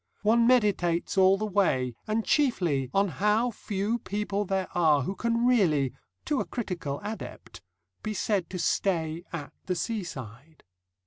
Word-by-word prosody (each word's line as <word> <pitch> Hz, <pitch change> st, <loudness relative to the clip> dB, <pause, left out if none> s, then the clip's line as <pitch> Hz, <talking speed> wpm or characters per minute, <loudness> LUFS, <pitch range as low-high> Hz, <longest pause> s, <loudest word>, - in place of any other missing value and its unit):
One 230 Hz, +2 st, +4 dB
meditates 200 Hz, -9 st, +2 dB
all 190 Hz, 0 st, +5 dB
the 215 Hz, -, -2 dB
way, 180 Hz, -, +1 dB
and 215 Hz, +1 st, 0 dB
chiefly 175 Hz, -, +1 dB
on 195 Hz, +1 st, +3 dB
how 210 Hz, +7 st, +1 dB
few 205 Hz, +2 st, -2 dB
people 205 Hz, -1 st, -2 dB
there 190 Hz, -1 st, -1 dB
are 155 Hz, -5 st, +3 dB
who 190 Hz, -, -2 dB
can 235 Hz, +3 st, 0 dB
really 165 Hz, -, +3 dB, 0.3 s
to 295 Hz, -4 st, 0 dB
a -, -, -1 dB
critical 175 Hz, -, -4 dB
adept 215 Hz, +2 st, -7 dB, 0.4 s
be 215 Hz, -1 st, -4 dB
said 200 Hz, -3 st, 0 dB
to 185 Hz, -, -5 dB
stay 170 Hz, -3 st, 0 dB
at 150 Hz, -4 st, -6 dB
the 180 Hz, -, 0 dB
seaside. 160 Hz, -, -6 dB
195 Hz, 145 wpm, -28 LUFS, 165-215 Hz, 0.4 s, all